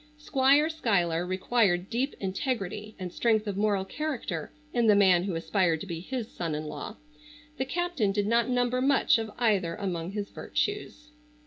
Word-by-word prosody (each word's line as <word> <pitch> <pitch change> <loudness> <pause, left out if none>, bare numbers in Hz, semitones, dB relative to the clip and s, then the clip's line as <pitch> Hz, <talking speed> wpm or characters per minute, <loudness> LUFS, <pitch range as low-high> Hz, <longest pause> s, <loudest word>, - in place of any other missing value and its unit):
Squire 285 0 +3
Schuyler 180 - 0
required 185 -1 +1
deep 260 +4 -1
integrity 210 0 -3
and 180 -2 -6
strength 220 -2 +2
of 205 -2 -3
moral 200 -1 +1
character 225 - -4 0.2
in 235 -2 +2
the 210 - +6
man 185 -3 +5
who 190 -4 -2
aspired 170 -1 +1
to - - -5
be 170 -4 -5
his 235 +5 -4
son 170 -9 -4
in 155 +1 -4
law. 150 +8 -6 0.6
The 265 - -1
captain 335 - 0
did 205 0 0
not 235 +2 +2
number 250 0 +1
much 270 -3 +4
of 225 -1 -4
either 200 -8 +1
among 180 -3 -3
his 205 -1 -4
virtues. 355 -7 -3
210 Hz, 170 wpm, -28 LUFS, 185-250 Hz, 0.6 s, the